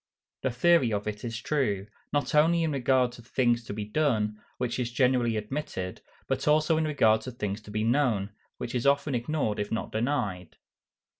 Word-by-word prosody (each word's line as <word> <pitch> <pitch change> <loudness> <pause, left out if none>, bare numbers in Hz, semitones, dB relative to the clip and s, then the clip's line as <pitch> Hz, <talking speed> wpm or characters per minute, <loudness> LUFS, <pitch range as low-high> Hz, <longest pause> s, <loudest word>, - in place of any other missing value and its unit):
_ - - -65
The 130 - +1
theory 130 0 +3
of 105 0 -2
it 105 0 -4
is 115 -1 -4
true, 115 -10 0 0.3
not 145 0 0
only 165 +3 +4
in 160 - 0
regard 130 -2 +2
to 120 - -12
things 120 0 +1
to - - -6
be 105 0 -4
done, 105 -4 0 0.2
which 125 0 -2
is 120 -1 -2
generally 120 -2 +2
admitted, 105 -5 -4 0.2
but - - -2
also 155 +2 +4
in 160 - +1
regard 110 -8 +3
to 130 - -6
things 105 -3 -4
to 105 - -14
be 105 +1 -1
known, 115 -5 +1 0.3
which 120 - -5
is 125 +1 0
often 140 +1 +2
ignored 120 -3 -1
if 105 0 -3
not 115 - -2
denied. 105 - -2
120 Hz, 195 wpm, -28 LUFS, 105-140 Hz, 0.3 s, only